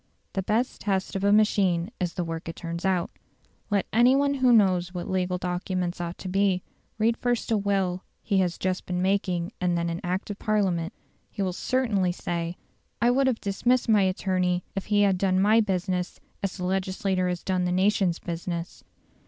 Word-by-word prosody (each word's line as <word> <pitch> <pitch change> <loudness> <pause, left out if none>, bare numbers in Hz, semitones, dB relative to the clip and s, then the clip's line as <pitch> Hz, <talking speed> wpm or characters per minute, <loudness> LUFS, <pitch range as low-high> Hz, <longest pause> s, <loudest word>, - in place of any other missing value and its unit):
The 195 - 0
best 220 +6 -1
test 195 -3 -1
of 195 - -2
a 200 - +4
machine 200 -4 +3
is 175 -2 -2
the 180 - -1
work 165 0 -5
it 165 - -6
turns 170 +1 -5
out. 185 -3 +1 0.6
Let 205 -2 +1
any 245 +3 +5
one 280 0 +2
who 260 -2 +3
knows 185 -5 +3
what 175 - -4
legal 185 -1 0
documents 180 0 -2
ought 170 0 -4
to - - -7
be, 190 -1 +1 0.3
read 225 +2 +2
first 245 -1 -1
a 220 - +4
will 195 -2 0 0.2
he 200 -3 +1
has 180 -2 0
just 185 0 -2
been 180 0 -1
making 185 -2 0
and 175 -1 +1
then 170 0 -1
an 170 +3 -4
Act 185 +3 -2
of 205 - -7
Parliament; 190 -5 0 0.4
he 200 - -3
will 185 -1 -1
certainly 210 -5 +1
say, 170 -1 -3 0.4
"I 240 +1 +4
would 270 +2 +3
have 250 -4 0
dismissed 240 +5 +1
my 215 -2 +5
attorney 185 -1 0
if 195 - -3
he 205 -1 +3
had 195 -2 +2
done 185 -1 +2
my 215 +4 +5
business 185 -2 -2 0.2
as 195 -1 -3
the 180 - -3
legislature 190 0 0
has 180 -1 -3
done 185 -1 0
the 180 - 0
nation's 185 -1 +2
business". 170 0 -5
185 Hz, 195 wpm, -26 LUFS, 180-205 Hz, 0.6 s, any